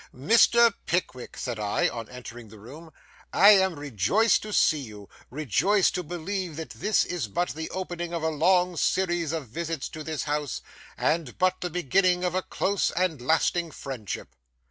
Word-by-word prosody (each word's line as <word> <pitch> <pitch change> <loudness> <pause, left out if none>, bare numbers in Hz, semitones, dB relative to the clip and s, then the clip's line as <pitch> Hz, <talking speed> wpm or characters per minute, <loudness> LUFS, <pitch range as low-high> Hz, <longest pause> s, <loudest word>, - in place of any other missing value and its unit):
'Mr. 230 - +5
Pickwick,' 165 -8 -2
said 120 -4 -4
I, 105 -1 +1
on 115 -2 -6
entering 120 -2 -10
the 110 +1 -14
room, 145 +10 -12 0.4
'I 200 - +7
am 190 -6 +3
rejoiced 145 - +2
to 215 - -7
see 155 -6 +3
you,—rejoiced 135 - -1
to 180 - -2
believe 175 +1 -4
that 160 +1 -7
this 210 0 +1
is 175 -10 -3
but 175 - -1
the 160 +2 -5
opening 175 -2 -5
of 170 -2 -3
a 160 - +2
long 180 +3 +2
series 175 -4 0
of 155 -7 -4
visits 165 +3 -4
to 155 - -8
this 155 -1 -3
house, 150 -2 -3 0.3
and 155 -6 -1
but 185 0 +1
the 180 - -2
beginning 180 +2 +1
of 180 -1 0
a 185 - 0
close 195 +1 0
and 170 -6 -1
lasting 165 +4 +1
friendship. 130 -9 -7
165 Hz, 165 wpm, -26 LUFS, 135-185 Hz, 0.4 s, I